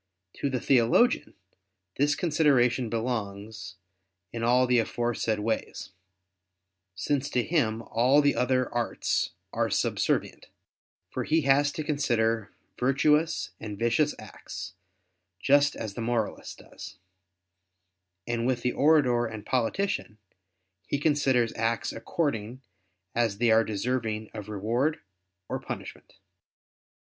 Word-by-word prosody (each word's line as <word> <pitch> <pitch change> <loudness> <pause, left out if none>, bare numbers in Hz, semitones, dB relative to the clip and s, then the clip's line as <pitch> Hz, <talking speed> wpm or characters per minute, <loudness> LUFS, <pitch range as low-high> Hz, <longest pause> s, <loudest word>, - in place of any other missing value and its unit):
To 140 - -1
the 130 -2 -1
theologian 130 - +3 0.6
this 145 +1 +2
consideration 135 -7 +2
belongs, 110 -4 -4 0.6
in 115 - -4
all 125 +2 +4
the 125 -1 +3
aforesaid 115 -1 -1
ways: 110 +1 -3 1.0
since 140 +8 -1
to 125 - +1
him 115 -9 0
all 125 +6 +3
the 145 -1 +3
other 130 0 +1
arts 120 -1 -1 0.2
are - - 0
subservient: - - -1 0.6
for - - -2
he 160 +1 +2
has 140 +1 +3
to 155 - -4
consider 115 -7 0 0.3
virtuous 150 +5 +2
and 105 -2 -6
vicious 120 +7 +1
acts, 85 - -9 0.7
just 145 +5 +4
as 110 -3 -5
the 115 - -5
moralist 115 -2 -2
does; - - -11 1.3
and 120 0 -1
with 125 -2 0
the 125 - +1
orator 135 -6 +3
and 110 -1 -8
politician 130 - -1 0.7
he - - 0
considers 140 -6 +2
acts 115 +1 -1
according 130 - -3 0.5
as 115 -4 0
they 120 +1 +3
are 110 +1 +5
deserving 110 0 -2
of 105 -1 -7
reward 115 +9 0 0.5
or - - -3
punishment. - - -8
120 Hz, 115 wpm, -27 LUFS, 110-140 Hz, 1.3 s, are